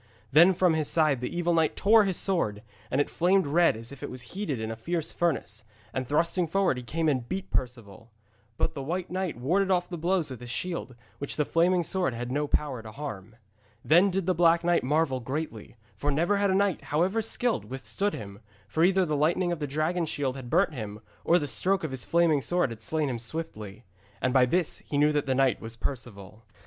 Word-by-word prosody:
Then 170 +6 +6
from 180 -1 +3
his 155 -2 0
side 155 -6 +2
the 125 - -2
evil 175 0 +1
knight 160 -2 +2
tore 215 +1 +5
his 190 -3 0
sword, 110 - 0 0.3
and 130 - 0
it 145 - +2
flamed 185 +2 +2
red 165 -3 +3
as 115 +2 -8
if 140 - -11
it - - -5
was 125 -1 -8
heated 180 - -3
in 110 0 -3
a - - -4
fierce 165 +7 -2
furnace, 135 -10 -2 0.3
and 130 -1 -3
thrusting 170 +4 +1
forward 185 -4 +1
he - - -4
came 160 +7 -2
and 130 -5 0
beat 190 0 -3
at - - -34
Perceval. 115 -4 -4 0.5
But 160 - 0
the 140 - -5
White 175 +6 -3
Knight 185 -6 -2
warded 180 +11 +1
off 180 -1 +2
the 175 -2 -5
blows 175 -3 0
with 130 - -7
his 120 - -8
shield, 170 -2 -4 0.2
which 140 - -3
the 150 - +1
flaming 175 +3 +2
sword 180 -7 -1
had 120 +1 -4
no 145 +2 0
power 140 -5 -1
to 110 -1 -10
harm. 110 -6 -7 0.5
Then 175 +6 +5
did 190 -1 -1
the 185 - +2
Black 170 0 +4
Knight 175 -4 +2
marvel 145 -1 +1
greatly, 130 -3 -5 0.2
for 145 - -2
never 170 +8 +2
had 200 0 +2
a 190 - +2
knight, 200 -3 +1
however 185 +9 +1
skilled, 230 +1 -1
withstood 135 +10 -3
him, 100 -2 -8 0.3
for 160 +11 0
either 190 +1 +4
the 155 -2 -1
lightning 170 +4 +1
of 170 - -2
the 145 - -2
dragon 160 +4 -1
shield 135 -3 -2
had 130 -3 -8
burnt 170 +2 +2
him, 105 -5 -6 0.2
or 170 - +4
the 145 - -2
stroke 190 +5 0
of 160 - -3
his 130 -2 -5
flaming 165 -4 +3
sword 175 -4 0
had 115 -1 -9
slain 155 +5 -1
him 125 -3 -3
swiftly. 115 -6 -6 0.3
And 130 - 0
by 130 -2 +5
this 175 +4 0
he 145 - -4
knew 150 +1 +4
that 145 -2 -1
this 130 - +1
knight 130 -4 +2
was 115 0 -7
Perceval. 115 -4 -6
155 Hz, 225 wpm, -27 LUFS, 125-175 Hz, 0.5 s, Then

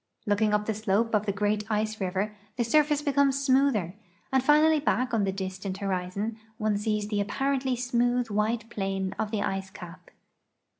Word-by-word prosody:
Looking 210 +1 +2
up 210 0 +1
the 220 - 0
slope 215 +2 0
of 210 0 +1
the - - +2
great 210 +1 0
ice 215 0 -1
river 195 +3 -1 0.2
the 240 - +2
surface 295 +4 +2
beconu's 280 -1 +2
smoother, 260 - +2 0.4
and 265 - +4
finally 305 +2 +5
back 255 -4 0
on 215 -3 +2
the 195 - 0
distant 190 0 -5
hormm 195 +3 -3 0.2
one 215 -2 0
sees 210 0 -1
tlu> 205 -1 0
appafently 265 +3 -1
smooth 245 0 +1
wliite 215 +2 0
plain 195 -2 -2
of 220 - -1
the 210 -2 -1
ice 195 -1 -3
cap. 180 -1 -11
215 Hz, 170 wpm, -27 LUFS, 200-250 Hz, 0.4 s, finally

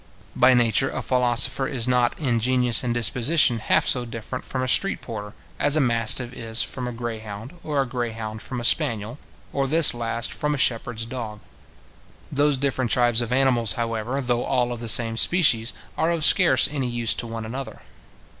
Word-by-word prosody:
By 130 0 +4
nature 120 +2 +2
a - - -5
philosopher 125 +1 +2
is 125 -5 -2
not 125 -1 +1
in 125 -6 0
genius 125 0 +2
and 125 - -2
disposition 120 +2 +2
half 110 - +1
so 125 - +1
different 115 +2 -8
from 130 -1 -4
a - - -3
street 195 +9 +2
porter, 105 -3 -8 0.2
as 145 - +3
a - - +2
mastiff 120 -1 +2
is 115 -1 -1
from 125 -2 -6
a - - -4
grey 115 -1 -6
hound, 110 +5 -9
or 150 -2 -2
a 135 - +1
grey 120 -2 -4
hound 110 -1 -7
from 125 - -7
a - - -6
spaniel, 115 +3 0 0.3
or 135 -1 -1
this 160 +2 +5
last 115 -1 -2
from 150 0 -1
a - - -5
shepherd's 115 -2 0
dog. 115 -3 -7 0.9
Those 145 0 +1
different 130 -2 -2
tribes 120 -1 +2
of 120 0 -5
animals, 125 -4 +2
however, 115 +2 -3
though 120 -2 -1
all 125 -2 -1
of 120 - -6
the 115 -1 -4
same 115 0 +3
species 120 -8 +2 0.3
are 160 - +1
of 165 -3 +1
scarce 165 -9 +4
any 135 -4 -3
use 120 -1 0
to 120 - -5
one 115 -1 -6
another. 130 +4 -8
120 Hz, 190 wpm, -22 LUFS, 115-130 Hz, 0.9 s, this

